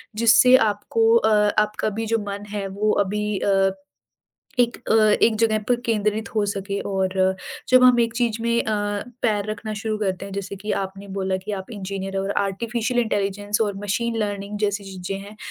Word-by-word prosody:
जिससे 235 +3 +6 0.2
आपको 225 +2 +1
अ, 220 -1 +3 0.3
आपका 210 +1 -2
भी 225 - -1
जो - - +1
मन 200 +1 -5
है 200 -1 -3
वो 215 0 +3
अभी 210 +1 -2
अ, 195 -1 +2 0.9
एक 235 -1 +2
अ, - - +5 0.3
एक 225 - +3
जगह 220 -1 +3
पर 245 - +4
केंद्रित 215 0 0
हो 215 -1 +2
सके 200 0 -3
और 190 -1 +1 0.3
जब 255 0 +6
हम 250 -1 +6
एक 230 -1 0
चीज़ 235 -2 0
में 235 0 +1
अ, 220 - -1 0.5
पैर 210 -3 0
रखना 215 0 -5
शुरू 215 0 -2
करते 195 -2 -2
हैं, 200 - -9
जैसे 200 0 -5
कि 210 +2 -6
आपने 195 +1 -8
बोला 190 -1 0
कि 200 +3 -6
आप 190 +1 -5
इंजीनियर 195 -1 -5
और 195 +1 -2
आर्टिफिशियल 235 +4 -1
इंटेलिजेंस 205 -1 -1
और 205 -2 -1
मशीन 230 +3 -1
लर्निंग 205 -1 -3
जैसी 205 -1 0
चीज़ें 190 0 -5
हैं। 210 +1 -12
210 Hz, 180 wpm, -23 LUFS, 195-225 Hz, 0.9 s, जिससे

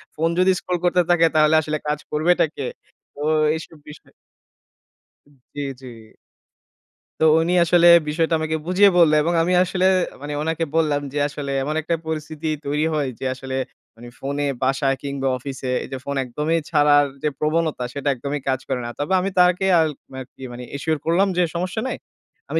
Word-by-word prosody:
Phone 165 +2 0
যদি 185 +1 +5
scroll 180 -1 -3
করতে 180 0 +3
থাকে 175 -1 +4
তাহলে 155 0 +4
আসলে 155 0 -3
কাজ 150 0 -1
করবেটা 165 +4 +3
কে?" 135 -3 -3 0.5
তো 145 - -9 0.3
এইসব 160 0 -9
বিষয় 150 -1 -14 1.2
উম 145 - -24 0.2
জি, 145 - -5 0.2
জি। 130 - -10 1.3
তো - - +5 0.2
উনি 170 +2 0
আসলে 175 0 +5 0.2
বিষয়টা 165 +2 0
আমাকে 160 0 -1
বুঝিয়ে 185 +3 +5
বললে 160 -3 +5
এবং 170 - 0
আমি 180 - 0
আসলে 185 0 -1 0.4
মানে, 145 +1 -5
ওনাকে 160 +1 -1
বললাম 150 -3 +2
যে, 150 - -3
"আসলে 140 -1 -6
এমন 150 +3 -3
একটা 165 +2 -1
পরিস্থিতি 155 0 -4 0.2
তৈরি 150 +2 0
হয়, 145 -3 0
যে - - -5
আসলে 130 0 -6 0.4
মানে 120 +1 -12
ফোনে 140 +1 -2 0.2
বাসায় 135 +1 +1
কিংবা 140 -1 -3
অফিসে, 130 0 -5
এই - - -8
যে 135 - -3
ফোন 140 - -3
একদমই 150 +7 -1
ছাড়ার 145 -2 +4 0.2
যে 150 - +2
প্রবণতা, 155 -3 0
সেটা 140 0 -2
একদমই 140 +3 -4
কাজ 130 -1 +1
করে 130 -2 -1
না।" - - -4
তবে 145 +6 -1
আমি 190 +2 -1
তাকে 180 +1 +4
আল 160 - +2 0.2
মা 130 - -7
কি 130 - -13
মানে 120 +1 -8
assure 155 +1 -1
করলাম 175 +5 +3
যে, 180 - +4
"সমস্যা 185 +5 -2
নাই। - - -3 0.5
আমি - - 0
150 Hz, 180 wpm, -21 LUFS, 140-165 Hz, 1.3 s, যদি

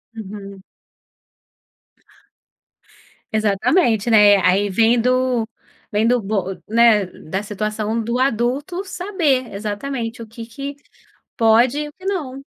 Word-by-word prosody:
Uhum. 200 -2 -9 2.7
Exatamente, 220 - +2
né. 210 -2 +7
A 185 -1 +3
aí 200 +3 +2
vem 225 +4 +3
do 250 -1 +1 0.4
vem 215 +1 +2
do 245 +1 +3
bo 195 -2 -3
né, 225 -2 +4
da 185 +1 -6
situação 215 +1 -3
do 235 +3 -2
adulto 270 - -1
saber 345 - -1
exatamente 225 +3 -4
o 230 - -8
que 230 +1 -9
que 275 +5 -7 0.6
pode 235 +4 +4
e 300 0 -3
o - - -14
que 370 - -18
não. 295 -9 -3
230 Hz, 120 wpm, -20 LUFS, 210-260 Hz, 2.7 s, né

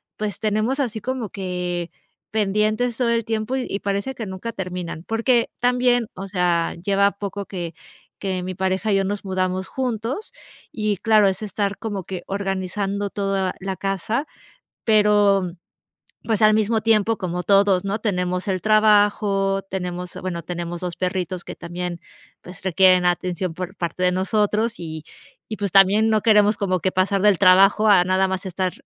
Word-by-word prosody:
pues 210 -3 -4
tenemos 215 +5 0
así 230 -5 -2
como 255 -2 -3
que 180 -2 -4 0.4
pendientes 215 +3 +1
todo 245 -2 +1
el 230 -1 +1
tiempo 225 +2 -2
y 245 -6 -3
parece 200 +7 -2
que 225 - -5
nunca 190 +4 -6
terminan. 180 -4 -5
Porque 230 +3 +1
también, 245 -1 +2
o 195 +2 -6
sea, 175 -3 +1
lleva 200 +1 +2
poco 200 0 -6
que 175 -4 -6 0.5
que 190 -2 -2
mi 185 +1 -5
pareja 190 +3 0
y - - +4
yo 195 - +2
nos 200 +1 -3
mudamos 185 0 -1
juntos 250 - -3 0.4
y 215 -2 -1
claro, 215 +1 +4
es 190 +1 -1
estar 205 -1 -2
como 205 -5 -5
que 185 -2 -6
organizando 195 +1 -2
todo 195 -2 -1
la 195 0 -4
casa. 195 - -2 0.6
Pero, 205 -4 +3 0.7
pues, 220 -2 0
al 215 0 +6
mismo 220 +1 +2
tiempo, 220 0 +2
como 180 -1 -3
todos, 195 -2 +4
¿no?, 200 +2 -2
tenemos 180 -3 -1
el 185 -2 -1
trabajo, 205 -2 +3
tenemos, 180 -1 -4
bueno, 180 -2 -4
tenemos 175 0 -5
2 180 -1 -4
perritos 185 -1 -3
que - - -7
también, 175 0 -5 0.4
pues 180 +2 -10
requieren 185 0 +4
atención 180 0 -1
por 185 +3 -6
parte 175 0 -3
de 180 0 +3
nosotros 210 +4 0
y 160 -2 -6 0.5
y 215 - -4
pues 200 -2 -3
también 200 +3 +5
no 215 -1 +2
queremos 210 -1 +4
como 185 -3 -1
que 185 +3 -1
pasar 190 +1 +1
del 205 -2 +4
trabajo 195 +3 +6
a 185 -3 +6
nada 190 +1 +2
más 190 0 -3
estar 185 0 -2
195 Hz, 165 wpm, -22 LUFS, 185-215 Hz, 0.7 s, al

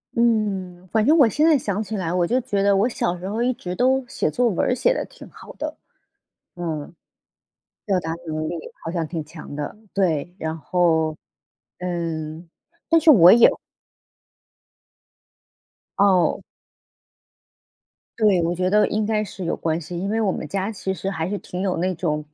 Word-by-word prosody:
嗯， 195 -6 0
反 220 0 +2
正 315 +3 +5
我 270 -6 +7
现 300 +8 +2
在 315 -3 +5
想 210 -2 -2
起 215 +2 -5
来， 175 -2 -2
我 180 -1 +2
就 250 +7 +1
觉 205 -5 -1
得 200 -1 +4
我 205 +5 +3
小 175 -5 -1
时 185 - -6
候 220 +4 -2
一 255 +1 +1
直 180 -5 -6
都 260 +2 +2
写 200 - -1
作 245 -1 +2
文 185 - 0
儿 - - +3
写 - - +2
得 - - -3
挺 - - -14
好 - - -13
的。 - - -5 0.8
嗯。 160 -2 -5 0.9
表 195 -3 +1
达 160 -1 -4
能 155 0 -3
力 170 - -3 0.3
好 - - -3
像 165 -2 -1
挺 160 -1 -5
强 150 -2 -10
的， 145 - -4 0.2
对， 175 -3 0
然 160 0 -3
后， 160 -1 +1 0.6
嗯， 165 -2 -4 0.4
但 330 0 +5
是 315 -1 +7
我 180 -6 +8
也 235 0 +8 2.5
哦。 190 -3 +3 1.8
对， 205 -5 +4
我 170 +1 0
觉 185 +1 0
得 210 +3 +4
应 215 0 -1
该 215 -1 0
是 190 -3 -7
有 170 - -1
关 165 0 -1
系， 175 +2 -8
因 195 +2 -3
为 225 +1 0
我 205 -4 +2
们 150 - -5
家 195 +6 -2
其 190 -2 -4
实 190 0 -5
还 180 -3 -2
是 205 - -2
挺 180 -1 -6
有 190 -2 -1
那 185 +2 0
种 150 -3 -2
185 Hz, 190 characters per minute, -22 LUFS, 165-215 Hz, 2.5 s, 我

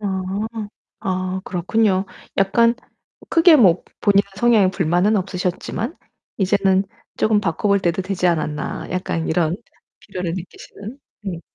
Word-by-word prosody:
아. 190 -2 -2 0.8
아 185 0 -2
그렇군요. 190 +2 +1 0.3
'약간 230 +5 +4 0.6
크게 330 -1 +7
뭐 185 -8 +5 0.2
본인의 200 -1 +4
성향에 215 -4 +4
불만은 180 +4 +2
없으셨지만 185 - -3 0.4
이제는 195 0 +2 0.3
쪼금 215 -1 +2
바꿔 190 +1 -1
볼 200 -1 +3
때도 180 +1 0
되지 185 -1 -1
않았나.' 155 -3 -2
약간 180 -3 -2
이런 165 +1 +1 0.4
필요를 180 -2 -4
느끼시는 200 +6 -9 0.2
네. 180 -5 -5
190 Hz, 270 characters per minute, -21 LUFS, 180-205 Hz, 0.8 s, 크게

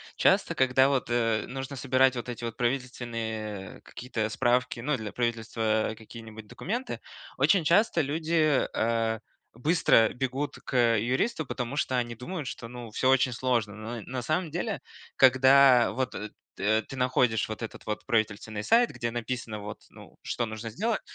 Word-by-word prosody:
часто, - - +3
когда 130 +1 +4
вот, 135 -3 0
э, 115 -2 +1
нужно 135 +1 -6
собирать 130 0 +3
вот 120 0 -5
эти 120 0 -6
вот 115 -1 -4
правительственные, 115 -5 -3
э, - - -21
какие-то 115 -4 -4
справки, 120 +1 +1
ну, 150 +3 0
для 110 -3 -6
правительства 110 -2 -1
какие-нибудь 110 -1 -11
документы, 235 - -4 0.4
очень 195 -4 +4
часто 170 +2 +3
люди, 155 0 +1
э, 115 0 0 0.4
быстро 125 -5 +4
бегут 130 +3 -3
к, - - -7
э, 115 -3 +4
юристу, 135 - 0
потому 125 +3 -4
что 130 -4 0
они 120 -1 -1
думают, 145 +7 -6
что, 115 - -6
ну, 120 -2 -9
всё 130 - +1
очень 130 -1 +4
сложно. 120 -4 0
Но 110 +2 -6
на 130 0 -4
самом 155 +5 -1
деле, 175 +2 -3 0.3
когда 130 -1 +6
вот, 130 +1 -2
э, 105 +2 -5 0.3
т 110 +2 +2
ты - - -8
находишь 125 -4 +2
вот 110 - -6
этот 115 - -8
вот 105 -1 -4
правительственный 110 -1 -1
сайт, 235 - +4
где 120 -1 -3
написано, 120 -2 -4
вот, 105 0 -8
ну, - - -15
что 120 - -2
нужно 110 0 -6
сделать. 215 - -1
120 Hz, 165 wpm, -28 LUFS, 110-135 Hz, 0.4 s, когда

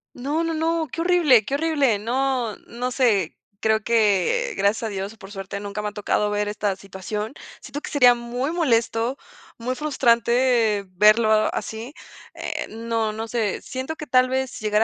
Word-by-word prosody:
No, 290 +6 -1
no, 330 0 -1
no, 325 0 0
qué 330 - -3
horrible, 330 - +4
qué 275 - -1
horrible. 285 -8 +1
No, 245 0 -1
no 250 +2 -4
sé, 220 - +1 0.2
creo 220 0 +2
que 235 - +2
gracias 205 +3 +1
a - - -1
Dios 195 +1 -4
o - - -20
por 195 -2 -12
suerte, 195 0 -6
nunca 205 +1 -5
me 210 - -2
ha - - -12
tocado 210 0 0
ver 205 0 0
esta 205 -1 -1
situación. 195 +4 -6 0.3
Siento 290 - -7
que - - -7
sería 250 -4 +6
muy 245 +4 -3
molesto, 240 -5 +1 0.4
muy 250 +2 -2
frustrante 235 -6 +2
verlo 215 +4 +4 0.2
así. 225 +5 -5 0.4
Eh, - - -4
no, 225 -1 -2
no 220 +1 -5
sé, 225 -4 -1
siento 265 +4 -5
que 305 - -8
tal 255 0 +4
vez 260 0 -2
llegara 215 0 +2
235 Hz, 175 wpm, -23 LUFS, 210-265 Hz, 0.4 s, sería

